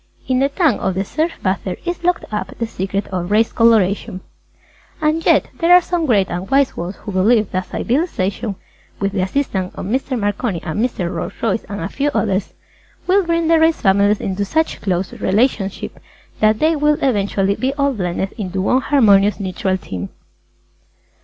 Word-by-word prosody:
In 255 -1 +1
the 275 +1 +2
tan 290 - +1
of 190 - -1
the 195 +1 -1
surf 320 - -1
bather 185 -1 -1
is 350 0 -3
locked 360 0 +1
up 210 - -4
the 230 - -1
secret 195 -2 -3
of 180 -1 -3
Race 220 +2 +3
Colouration. 205 -5 +2 0.8
[Illustration:BLACK - - -26
RACE] 305 0 +3
And 325 +1 -4
yet - - +4
there 335 +1 +3
are 360 - +9
some 345 -2 -2
Great 200 -6 +3
and 180 +2 -4
Wise 275 0 +2
Ones 175 +3 -5
who 210 - -8
believe 210 +3 +2
that 185 -1 -2
Civilization 230 - -1 0.4
(with 195 0 0
the 195 -2 -1
assistance 190 -3 -2
of - - -6
Mr. 260 +5 -1
Marconi 205 -2 -1
and 160 +4 -3
Mr. 185 -8 -2
Rolls 170 - -4
H. - - -19
Royce 225 -1 0
and 205 -3 -6
a 165 - -2
few 280 +7 -1
others) 195 -2 -1 0.5
will 385 +2 +3
bring 335 -1 0
the 330 0 +4
Race 320 0 +3
Families 200 +1 +3
into 195 +1 -2
such 315 +11 -1
close 185 -2 -1
relationship 200 -1 -1 0.4
that 215 0 +3
they 315 +5 +2
will 300 0 +2
eventually 200 -5 +1
be 255 +6 -1
all 280 -1 +1
blended 190 -2 -2
into 190 -2 -3
one 250 +7 +2
harmonious 210 -9 +4
Neutral 190 -1 -1
Tint! 95 - -6
210 Hz, 185 wpm, -18 LUFS, 190-280 Hz, 0.8 s, are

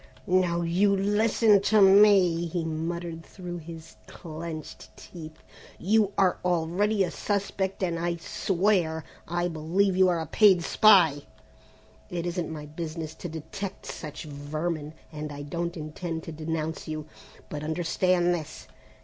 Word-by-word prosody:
"Now 180 -2 +2
you 190 +4 +2
listen 210 +1 +3
to 215 +1 +3
me," 195 -4 +6
he 170 0 -3
muttered, 165 +1 -4
through 175 -1 -8
his 165 0 -11
clenched 160 -1 -8
teeth. 160 -2 -11 0.3
"You 205 +1 +2
are 185 -2 +3
already 180 +4 +1
a 180 - -2
suspect 195 -1 -2
and 170 -2 -1
I 170 0 -1
swear 175 -2 0 0.2
I 175 +1 -1
believe 175 +4 0
you 185 0 +5
are 175 -2 +1
a 160 - -3
paid 190 0 +5
spy! 175 -8 +5 0.9
It 175 -1 -3
isn't 175 -2 -3
my 150 -2 -6
business 155 +1 -6
to 170 +2 -7
detect 165 +5 -7
such 150 -2 -7
vermin, 155 +1 -4 0.2
and 150 -1 -6
I 145 0 -7
don't 170 +3 -4
intend 160 +1 -5
to - - -7
denounce 160 0 -4
you, 155 -1 -4 0.4
but 150 0 -6
understand 175 +2 +1
this! 160 -4 -6
170 Hz, 140 wpm, -27 LUFS, 160-185 Hz, 0.9 s, me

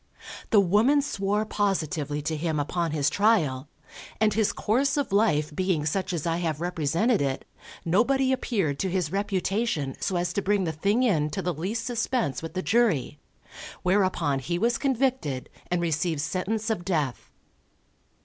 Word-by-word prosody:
The 215 - +5
woman 215 +10 +4
swore 210 -6 -1
positively 160 -8 -1
to 160 +1 -1
him 155 0 -1
upon 170 +4 -1
his 150 -2 0
trial, 155 -10 +2 0.5
and 215 -1 +3
his 215 0 +2
course 275 +7 +1
of 285 -7 -1
life 155 -8 +2
being 185 -4 0
such 185 +5 -1
as 170 -3 -3
I 165 0 0
have 160 -4 -2
represented 175 - +1
it, 135 -1 -2 0.4
nobody 260 +9 +2
appeared 195 - -1
to 190 - 0
his 180 -4 -1
reputation 195 - -1
so 190 - -1
as 175 0 -1
to 200 - 0
bring 200 0 +1
the 165 - -1
thing 200 +10 +1
in 160 -11 +2
to 150 - -4
the 180 - -1
least 200 +9 -3
suspense 235 - -1
with 165 +2 -7
the 185 - -2
jury; 180 - +1 0.6
whereupon 185 -7 +1
he 170 +6 -2
was 235 +5 +1
convicted 260 - 0 0.2
and 180 -1 0
received 160 -1 0
sentence 200 +7 -2
of 205 -5 -2
death. 155 -9 -2
185 Hz, 160 wpm, -26 LUFS, 155-215 Hz, 0.6 s, The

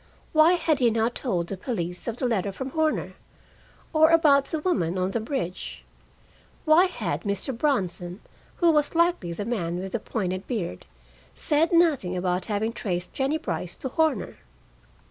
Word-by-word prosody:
Why 315 +2 +6
had 325 -4 +1
he 245 -2 +4
not 225 +1 +1
told 185 -11 -1
the 195 - -5
police 180 -5 -4
of 235 0 -3
the 255 - -2
letter 205 -5 0
from 265 +7 -6
Horner? 315 0 0 0.8
Or 315 0 +6
about 295 -4 +5
the 320 - -3
woman 190 - 0
on 185 +1 0
the 230 - -1
bridge? 215 - -4 0.8
Why 320 +4 +6
had 365 - -3
Mr. 200 +5 -2
Bronson, 190 - -1 0.4
who 340 -2 +4
was 300 0 +1
likely 335 - +2
the 200 +4 -4
man 175 -7 -2
with 190 +1 -5
the 235 - -1
pointed 190 -4 -3
beard, 185 - -4 0.5
said 310 +2 +2
nothing 300 - +3
about 180 0 -1
having 220 +1 -1
traced 180 -5 -3
Jennie 275 +3 0
Brice 175 - -4
to 265 - -5
Horner? 310 - 0
230 Hz, 165 wpm, -26 LUFS, 185-305 Hz, 0.8 s, Why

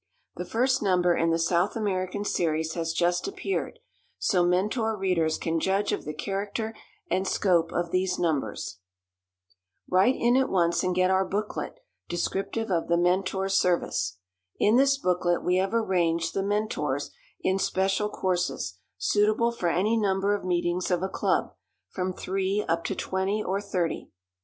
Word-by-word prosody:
The - - -5
first 255 +3 +1
number 180 -3 +3
in 165 - +2
the 165 - +2
South 170 +3 +1
American 200 -2 -2
series 160 -3 0
has 165 -1 -2
just 175 - +1
appeared, 390 +4 -3 0.4
so 180 -2 +2
Mentor 210 +5 +1
readers 175 -5 +1
can 165 0 -1
judge 195 +4 +1
of - - -3
the 150 - -4
character 205 +5 -3 0.4
and 190 +1 +1
scope 175 -5 +2
of 175 -1 -2
these 185 0 +1
numbers. 155 - -2 1.1
Write 190 +8 +4
in 240 +1 +2
at 265 0 +2
once 170 -2 +2
and 180 -1 0
get 185 0 +3
our 190 0 +3
booklet 205 +3 -3 0.3
descriptive 195 +5 -2
of 170 -2 0
The 170 - +3
Mentor 185 +2 +1
Service. 175 - +1 0.4
In 210 +2 +4
this 275 +2 +4
booklet 180 -6 +1
we 180 +1 +2
have 190 +1 +1
arranged 170 -6 +1
The 195 - 0
Mentors 205 +2 -1 0.3
in 190 +1 +1
special 195 +2 +1
courses, 175 - -2 0.2
suitable 210 - +2
for 180 -7 -1
any 195 +7 +2
number 200 -1 +1
of 205 - -2
meetings 175 0 0
of 180 -1 +1
a 190 - -1
club, - - 0 0.4
from 185 0 -2
three 195 +2 -1
up 165 0 0
to - - -1
twenty 195 +3 -1
or 195 +2 -1
thirty. 180 -5 -2
185 Hz, 155 wpm, -27 LUFS, 175-205 Hz, 1.1 s, Write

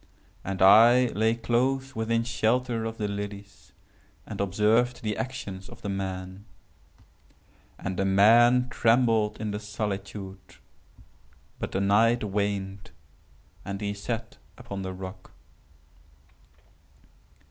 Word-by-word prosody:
And 95 -1 -1
I 120 +5 +7
lay 110 +2 +1
close 130 +3 -1
within 115 +1 0
shelter 120 0 0
of 115 0 -5
the 105 - -2
lilies, 100 0 -7 0.5
and - - -5
observed 110 +6 +1
the 105 -1 -1
actions 105 -6 -6
of - - -14
the 100 - -3
man. 95 0 -5 1.3
And 95 -1 -5
the 95 - 0
man 120 +6 +5
trembled 115 -3 +2
in 110 -1 -3
the 105 - -4
solitude;—but 95 -8 -9
the 95 - -1
night 110 +4 +3
waned, 100 -1 -3 0.7
and 100 0 -5
he 100 -1 -3
sat 115 +3 -5 0.2
upon 110 -6 -7
the 95 0 -4
rock. 95 0 -9
105 Hz, 110 wpm, -27 LUFS, 95-115 Hz, 1.3 s, I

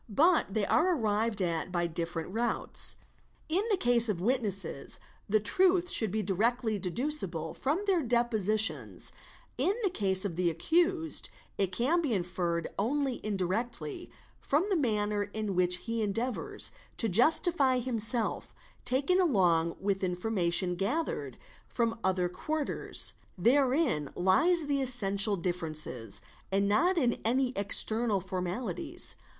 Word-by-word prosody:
But 295 - +2
they 215 -2 +1
are 360 - +2
arrived 215 -4 0
at 170 0 -2
by 175 -1 0
different 170 0 -4
routes; 235 +4 +1 0.5
in 345 +5 +1
the 405 - +2
case 240 -5 +5
of 195 -5 -1
witnesses 195 - -1 0.3
the 215 +1 +3
truth 360 - +2
should 220 - +2
be 215 +3 -2
di 195 0 -2
rectly 220 0 0
deducible 180 - -2
from 305 +9 -2
their 380 -4 +2
depositions, 220 -4 +2 0.5
1n 385 - +2
the 390 - +1
case 190 - +2
of 175 -4 -4
the 180 -1 +2
accused 325 - +1 0.3
it 195 -2 0
can 275 - +1
be 290 -8 -1
inferred 175 -2 -2
only 265 +4 -1
indirectly 220 - -3 0.3
from 300 +6 0
the - - +3
manner 210 -8 0
in 205 0 -4
which 180 0 +2
he 230 -1 -2
endeavours 245 - -2 0.3
to 225 - +3
justify 265 - +3
himself 235 -2 0 0.3
taken 285 +9 +1
along 175 - +2
with 195 -1 -2
information 180 -1 +1
gathered 195 - -3 0.3
from 230 -1 -2
other 185 -1 +1
quarters. 305 - 0 0.2
Therein 250 - +2
lies 315 - +3
the 285 -1 -1
essential 205 -5 +3
difference 165 -3 -3 0.6
and 200 +1 +1
not 345 - +2
in 245 -7 0
any 255 +3 +1
external 210 +2 +1
formalities. 190 - -3
220 Hz, 130 wpm, -30 LUFS, 185-275 Hz, 0.6 s, case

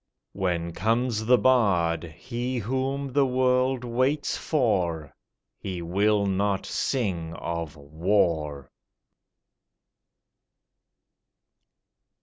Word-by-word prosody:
When 85 -3 -1
comes 115 +1 0
the 125 0 +6
bard, 90 -11 +2
he 120 - -4
whom 130 +4 -2
the 140 -1 +3
world 130 0 +1
waits 130 +5 0
for, 90 - 0 0.5
He 90 -3 -5
will 100 +4 +2
not 100 0 0
sing 90 -11 -2
of 85 -3 -4
War. 75 -2 -1
105 Hz, 80 wpm, -26 LUFS, 85-125 Hz, 0.5 s, the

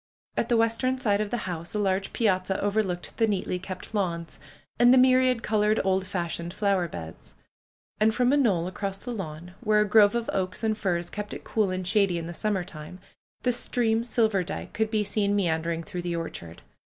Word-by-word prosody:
At 235 - -1
the 240 - +4
western 230 +3 +1
side 210 -5 +1
of 210 - -2
the 235 -2 -3
house 170 0 -5
a - - +1
large 195 -1 0
piazza 190 -4 +1
overlooked 200 -4 -1
the 225 - +3
neatly 185 -3 -1
kept 185 +3 -8
lawns, 170 -5 -2 0.4
and 240 0 +7
the 260 - +7
myriad 255 -2 +4
colored, 215 0 +2
old 190 0 +1
fashioned 175 -1 -3
flow 200 -1 +2
er 175 - -1
beds. 80 - -9 0.6
And 215 +1 +4
from 250 +3 +2
a - - +4
knoll 200 -11 +2
across 195 +1 -4
the 245 +4 -6
lawn, 175 -3 -7
where 215 -2 +3
a - - +3
grove 210 +1 +6
of 235 -1 -1
oaks 185 +2 -2
and 220 -1 +1
firs 175 -4 -2
kept 210 0 -5
it - - -9
cool 215 -3 0
and 185 -1 -3
shady 195 -3 +3
in 165 - -4
the 170 - -6
summer 200 0 -1
time, 165 0 -10 0.5
the 250 - +3
stream 230 -2 0
Silverdike 220 -6 -1
could 220 0 0
be 215 -1 +1
seen 205 0 0
me 200 -3 +2
andering 165 +1 -1
through 175 +2 -5
the 175 -1 -3
orchard. 85 - -6
200 Hz, 205 wpm, -27 LUFS, 175-220 Hz, 0.6 s, and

